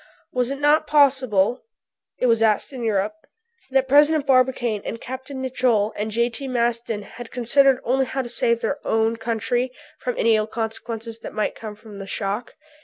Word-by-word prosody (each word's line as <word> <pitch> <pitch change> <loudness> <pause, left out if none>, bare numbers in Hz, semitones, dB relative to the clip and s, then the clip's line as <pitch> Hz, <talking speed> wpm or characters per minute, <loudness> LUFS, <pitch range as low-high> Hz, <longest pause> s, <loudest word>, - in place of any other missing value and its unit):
Was 250 -1 0
it 275 - -2
not 295 +2 +3
possible, 260 -7 +3 0.6
it - - 0
was 230 -2 +3
asked 220 +4 +2
in 255 - -6
Europe, 210 -1 0 0.6
that 265 0 +2
President 295 +2 +5
Barbicane 255 -5 +2
and 230 - -5
Capt. 260 +2 -7
Nicholl 255 -5 0
and 210 +1 -2
J.T. 235 +4 -1
Maston 235 -3 -1
had 240 +3 -10
considered 260 +2 +3
only 265 +2 +2
how 265 +1 -2
to - - -6
save 235 0 +1
their 290 - -1
own 225 +1 +1
country 240 +2 -1 0.3
from 250 -1 -3
any 225 -1 +4
ill 215 0 0
consequences 225 0 -5
which - - -8
might 215 - -1
come 215 -2 -8
from 210 -1 -12
the 195 - -7
shock? 200 +5 -3
240 Hz, 175 wpm, -23 LUFS, 220-260 Hz, 0.6 s, President